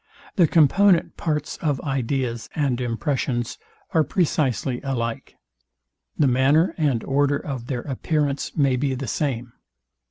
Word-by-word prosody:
The 175 -4 +5
component 170 +4 +4
part 150 -2 -2
of 145 -5 0
ideas 130 -3 -2
and 135 -5 0
impressions 120 0 -2 0.3
are 160 - +3
precisely 135 - 0
alike. 120 -4 -3 0.8
The 150 - +3
manner 135 +7 +3
and 140 -8 0
order 145 +1 +2
of 130 -5 -6
their 125 -3 -2
appearance 145 +1 -2
may 135 -3 +3
be 135 0 0
the 135 +2 -4
same. 120 -2 -2
135 Hz, 125 wpm, -23 LUFS, 125-150 Hz, 0.8 s, The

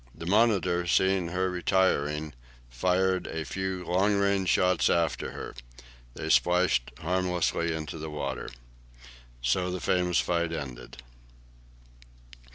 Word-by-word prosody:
The 85 - -8
"Monitor," 95 -4 +2
seeing 95 0 +2
her 90 +2 -1
retiring, 80 -5 0 0.4
fired 95 +8 +1
a 80 -1 -4
few 95 -1 -4
long 95 +4 +2
range 100 -2 +1
shots 90 -1 +3
after 85 -2 0
her. - - -7 0.6
They - - -3
splashed 90 0 +3
harmlessly 90 -1 0
into 80 0 -6
the 80 0 -5
water. 70 -4 -4 0.9
So 90 +9 +1
the 90 0 -3
famous 90 -1 +1
fight 85 -1 0
ended. 65 -4 -7
90 Hz, 115 wpm, -28 LUFS, 80-95 Hz, 0.9 s, shots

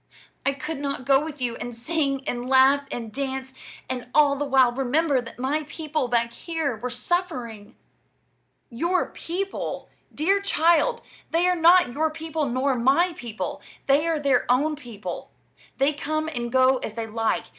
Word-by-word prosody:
I 275 - +3
could 305 +2 -5
not 275 -3 -3
go 275 +2 +4
with 305 -2 -7
you 235 -1 -1
and 245 -1 -6
sing 275 +1 -1
and 245 0 -3
laugh 270 +2 +5
and 230 -3 -6
dance, 265 0 -4 0.3
and 250 -1 -4
all 290 -2 +5
the 290 +1 -2
while 265 -3 +4
remember 270 +2 +1
that 230 - -11
my 280 +5 -1
people 305 -4 -2
back 235 -1 0
here 320 -2 -3
were 240 +3 -5
suffering." 245 - -3 1.0
"Your 340 +10 0
people! 385 +4 -4 0.2
Dear 390 +6 +1
child, 395 +6 +2 0.3
they 340 +2 +2
are 360 - +3
not 345 -5 +5
your 315 +4 +1
people 315 -1 -3
nor 260 +3 +1
my 275 +9 +3
people; 230 -5 -5 0.2
they 285 +4 +3
are 325 -2 +1
their 275 -4 +2
own 295 +5 +2
people. 235 -8 -7 0.5
They 275 +3 +2
come 310 +1 -2
and 240 -6 -4
go 260 +1 +4
as 220 -3 -6
they 230 -1 -3
like. 225 0 -1
275 Hz, 165 wpm, -25 LUFS, 245-315 Hz, 1.0 s, laugh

